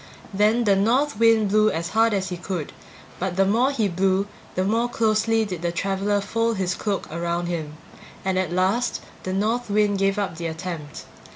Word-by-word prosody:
Then 215 Hz, +4 st, +3 dB
the 200 Hz, -3 st, +4 dB
North 235 Hz, +5 st, +1 dB
Wind 225 Hz, -2 st, +4 dB
blew 215 Hz, +1 st, +4 dB
as 170 Hz, -1 st, -3 dB
hard 225 Hz, +1 st, +3 dB
as 190 Hz, -1 st, -2 dB
he 180 Hz, -, -3 dB
could, 175 Hz, -3 st, -5 dB, 0.5 s
but 185 Hz, -1 st, -2 dB
the 195 Hz, +1 st, +3 dB
more 230 Hz, +7 st, +3 dB
he 230 Hz, -7 st, 0 dB
blew 190 Hz, +2 st, +1 dB, 0.3 s
the 185 Hz, -, +1 dB
more 225 Hz, +5 st, +1 dB
closely 225 Hz, 0 st, +2 dB
did 180 Hz, -5 st, -5 dB
the 175 Hz, 0 st, -1 dB
traveler 195 Hz, +3 st, 0 dB
fold 230 Hz, +2 st, -1 dB
his 185 Hz, -1 st, 0 dB
cloak 200 Hz, 0 st, -2 dB
around 170 Hz, +1 st, -2 dB
him; 160 Hz, -3 st, -4 dB, 0.5 s
and 190 Hz, -1 st, +1 dB
at 185 Hz, -3 st, -1 dB
last 190 Hz, +7 st, +1 dB, 0.2 s
the 185 Hz, -, -4 dB
North 220 Hz, +5 st, 0 dB
Wind 205 Hz, -1 st, +2 dB
gave 195 Hz, +1 st, +1 dB
up 195 Hz, -5 st, -2 dB
the 170 Hz, 0 st, -3 dB
attempt. 160 Hz, -2 st, -6 dB
195 Hz, 190 wpm, -23 LUFS, 180-220 Hz, 0.5 s, the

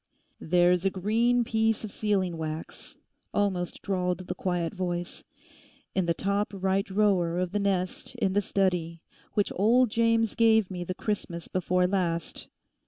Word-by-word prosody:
'There's 175 Hz, +1 st, +3 dB
a 195 Hz, -, +3 dB
green 225 Hz, +6 st, +2 dB
piece 225 Hz, -1 st, +1 dB
of 215 Hz, -, -5 dB
sealing 190 Hz, -5 st, 0 dB
wax,' 160 Hz, 0 st, -6 dB, 0.4 s
almost 190 Hz, -4 st, -1 dB
drawled 180 Hz, -2 st, -1 dB
the -, -, -3 dB
quiet 175 Hz, -3 st, -2 dB
voice, 175 Hz, -2 st, -4 dB, 0.7 s
'in 185 Hz, -2 st, 0 dB
the 170 Hz, -, +3 dB
top 200 Hz, +3 st, 0 dB
right 190 Hz, +1 st, 0 dB
drawer 190 Hz, -4 st, +2 dB
of 180 Hz, -1 st, -1 dB
the 205 Hz, -, 0 dB
nest 195 Hz, +3 st, -2 dB
in 200 Hz, -6 st, 0 dB
the 205 Hz, -, +3 dB
study, 180 Hz, -4 st, 0 dB, 0.4 s
which 205 Hz, -2 st, +1 dB
old 235 Hz, +4 st, +4 dB
James 230 Hz, -1 st, +2 dB
gave 220 Hz, -4 st, +3 dB
me 180 Hz, -1 st, -4 dB
the 180 Hz, +1 st, -4 dB
Christmas 180 Hz, -6 st, -3 dB
before 180 Hz, 0 st, +1 dB
last. 175 Hz, -3 st, -2 dB
190 Hz, 150 wpm, -28 LUFS, 175-210 Hz, 0.7 s, old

